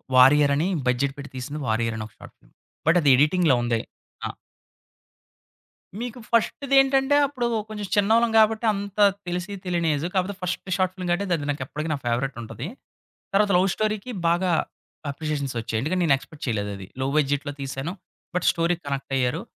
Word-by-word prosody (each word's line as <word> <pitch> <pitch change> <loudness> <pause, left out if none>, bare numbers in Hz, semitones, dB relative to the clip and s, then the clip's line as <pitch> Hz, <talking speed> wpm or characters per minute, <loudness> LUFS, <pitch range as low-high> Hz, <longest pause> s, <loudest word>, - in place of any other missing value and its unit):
Warrior 140 +3 +7
అని 155 +5 +1 0.2
budget 130 +2 +1
పెట్టి 140 0 -9
తీసింది 145 +4 -5
వారియర్ 115 +1 0
అని 110 - -4
ఒక - - -24
షార్ట్ - - -13
ఫిల్మ్. - - -27 0.3
బట్ 165 +2 +5
అది 145 - +4
ఎడిటింగ్‌లో 150 0 +4
ఉంది. 120 -1 +1 0.5
ఆ! - - -4 1.7
మీకు 245 0 -5
ఫస్ట్ 235 +4 +1
దేంటంటే 270 +1 +5
అప్పుడు 260 -4 -2 0.2
కొంచెం 210 -1 -5
చిన్నోళ్ళం 225 +3 +4
గాబట్టి 220 +1 +4
అంత 200 0 -6 0.3
తెలిసి 180 +3 -3
తెలియని 175 -2 0
ఏజు. 145 +3 -2
కాకపోతే 190 +1 0
ఫస్ట్ 180 +1 -3
షార్ట్ 185 -1 +1
ఫిల్మ్ 185 -2 -5
గాబట్టి 180 +1 +1
అది 145 -2 -5
నాకెప్పటికి 145 +3 -4
నా - - +1
ఫేవరెటుంటది. 120 +1 -3 0.7
తర్వాత 205 +1 +4
లవ్ 185 +2 +3
స్టోరీ‌కి 215 +2 -2 0.2
బాగా 175 +1 +2 0.6
అప్రిషియేషన్సొచ్చాయి. 140 -6 -3
ఎందుకంటే, 165 +8 -1
నేను 145 -4 +5
ఎక్స్‌పెక్ట్ 135 +3 -11
చేయలేదది. 100 -4 -3
లో 130 - 0
బడ్జెట్‌లో 145 0 +1
తీసాను. 135 +4 -4 0.4
బట్ 180 - 0
స్టోరీ‌కి 170 +1 0
కనెక్టయ్యారు. 135 +2 -1
160 Hz, 155 wpm, -24 LUFS, 135-195 Hz, 1.7 s, వారియర్